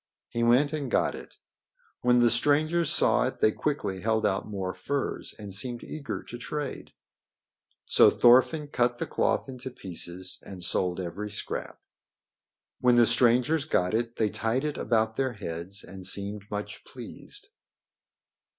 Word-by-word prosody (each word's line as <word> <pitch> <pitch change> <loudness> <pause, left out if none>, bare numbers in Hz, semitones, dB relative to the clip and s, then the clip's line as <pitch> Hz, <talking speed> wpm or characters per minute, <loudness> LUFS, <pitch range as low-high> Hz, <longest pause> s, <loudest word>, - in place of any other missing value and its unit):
He 120 - -2
went 125 +6 +4
and 145 -4 -3
got - - +2
it. - - -10 0.7
When 125 0 +4
the 120 -1 +5
strangers 155 +3 +2
saw - - +3
it - - -5
they 110 - +4
quickly 105 -10 -2
held 110 +1 +1
out 95 -1 0
more 95 -3 -3
furs 135 +10 -3
and 105 -2 -8
seemed 120 +4 -1
eager 150 -3 -5
to 120 - -9
trade. 150 +1 -5 0.9
So - - +6
Thorfinn 130 +5 +4
cut 120 -2 +1
the - - -2
cloth - - 0
into 130 0 -7
pieces 90 -4 -5
and 95 -2 -10
sold 90 0 0
every 95 +4 -4
scrap. 105 - -4 1.0
When 125 -1 +4
the 120 -1 +6
strangers 125 +7 +3
got 90 -11 +1
it 115 +1 -1
they 110 -2 0
tied 115 +5 0
it 150 -1 -2
about 110 -1 +1
their 130 -2 0
heads 95 -1 -5
and 95 -1 -10
seemed 100 +2 -2
much 105 0 -5
pleased. - - -10
115 Hz, 150 wpm, -28 LUFS, 100-130 Hz, 1.0 s, So